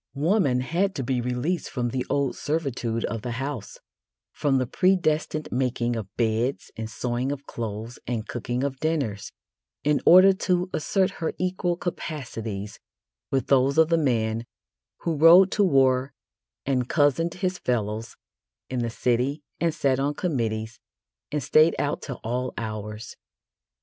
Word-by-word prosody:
Woman 145 - +2
had 180 +9 0
to 135 - -2
be 125 0 0
released 125 +8 -2
from 120 -2 -2
the 125 +1 -2
old 140 -2 0
servitude 130 -7 -2
of 115 - -4
the 120 +1 -4
house 135 -3 -5 0.5
from 140 -2 +1
the 130 - +1
predestined 155 -1 +1
making 120 -2 0
of 110 -4 -4
beds 115 +3 0
and 110 0 -5
sewing 125 +4 -2
of 140 -1 -6
clothes 115 +1 -6
and 115 -2 -3
cooking 120 +1 -3
of 135 -2 -2
dinners 140 -11 -2 0.5
in 150 0 +2
order 185 +3 +8
to 185 -1 0
assert 190 +5 +1
her 160 - -1
equal 180 -1 -1
capacities 115 - -5 0.5
with 135 -3 0
those 135 +1 +3
of 160 0 +5
the 165 - +4
man 115 -5 0 0.6
who 165 -2 -1
rode 175 +5 +8
to 210 - +2
war 135 -5 +3 0.5
and 130 -3 0
cozened 155 +2 +2
his 185 0 -2
fellows 110 -2 -2 0.6
in 130 - -1
the 120 -1 -1
city 125 +5 0 0.2
and 170 -1 +2
sat 135 -3 +1
on 145 +2 0
committees 110 -8 -2 0.5
and 150 -2 -1
stayed 155 +5 +5
out 145 0 -1
till 135 -4 -6
all 125 +3 -2
hours. 110 0 -6
130 Hz, 150 wpm, -25 LUFS, 120-155 Hz, 0.6 s, order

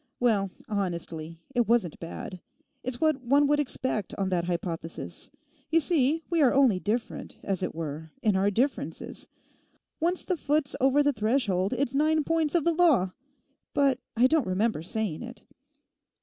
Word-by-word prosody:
well, 210 -5 +2 0.2
honestly, 170 -5 -3 0.2
it 240 -3 +2
wasn't 225 -8 +1
bad; 175 +2 -7 0.4
it's 255 -1 -3
what 310 -4 +2
one 280 +4 +4
would 295 +1 +3
expect 260 -7 -1
on 195 -1 0
that 175 -2 0
hypothesis. 170 -2 -4 0.4
You 330 - +4
see, 315 0 +2
we 340 -2 +1
are 265 - +6
only 260 -9 +4
different, 225 +5 -3
as 195 -2 -1
it 180 - -3
were, 160 0 -5
in 210 -3 +3
our 195 +2 +3
differences. 250 +8 -2 0.7
Once 350 +3 0
the 365 - 0
foot's 295 -1 0
over 270 +2 +4
the 290 0 +2
threshold, 210 -4 +1
it's 255 0 0
nine 310 +2 +3
points 325 0 +1
of 335 - +3
the 340 - +3
law! 310 - +4 0.6
But 275 -3 +3 0.2
I 240 - +5
don't 285 -3 +3
remember 190 -1 0
saying 185 -1 -2
it. 240 0 -9
240 Hz, 160 wpm, -28 LUFS, 185-290 Hz, 0.7 s, are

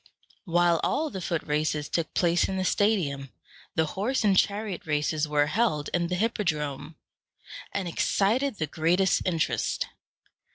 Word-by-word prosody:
While 175 -1 +3
all 310 -1 0
the 190 - -5
foot 165 -2 -2
races 150 0 -1
took 165 -2 -2
place 175 -1 +2
in 190 - -2
the 185 - -1
stadium, 165 -11 +1 0.5
the 160 - +3
horse 230 +7 0
and 200 -2 +4
chariot 200 -2 0
races 150 0 0
were 150 -1 +2
held 155 -3 0
in 175 -1 +1
the 180 - -1
hippodrome, 155 -8 -2 0.8
and 195 -3 -2
excited 220 +9 +1
the 160 - -2
greatest 170 +5 +2
interest. 165 -4 0
175 Hz, 140 wpm, -27 LUFS, 155-200 Hz, 0.8 s, and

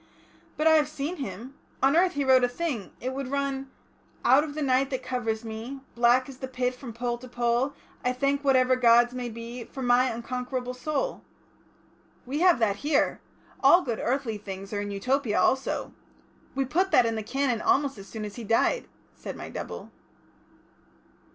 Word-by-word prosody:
But 310 - 0
I 320 0 +7
have 300 -1 +2
seen 305 +4 -4
him. 240 0 -6 0.3
On 270 +3 +5
earth 360 +2 +4
he 285 - 0
wrote 260 -1 +5
a 245 - +3
thing... 250 - -3
it 255 +1 -3
would 275 -1 -4
run 275 0 -2 0.6
"Out 265 +4 +6
of 295 -2 -6
the 305 - -2
night 265 0 +2
that 260 -3 -3
covers 230 -3 -2
me, 225 +5 -6
Black 240 +2 +4
as 270 -2 -10
the 260 - -4
pit 250 -1 -1
from 250 -1 -9
pole 240 +1 -3
to 255 - -10
pole, 240 +3 0 0.3
I 250 - +2
thank 275 +3 0
whatever 260 -2 +4
Gods 240 0 +5
may 250 -1 -4
be, 230 +2 -7
For 265 +3 -8
my 245 +1 +4
unconquerable 250 +2 -4
soul...." 305 - -2 1.0
"We 275 +4 -3
have 360 -2 +5
that 210 -4 +1
here. 295 +6 +1 0.4
All 355 +1 +6
good 235 -4 -3
earthly 245 -4 -1
things 195 0 -7
are 205 - -1
in 205 - -4
Utopia 230 +3 0
also. 265 +1 +1 0.6
We 270 0 +1
put 365 +9 +1
that 250 - +5
in 230 - 0
the 220 - -2
Canon 245 0 -1
almost 275 -5 +1
as 195 - -10
soon 220 -2 -6
as 205 +2 -8
he 235 - -6
died," 230 - +1 0.3
said - - -7
my - - -8
double. - - -7
255 Hz, 185 wpm, -27 LUFS, 235-275 Hz, 1.0 s, I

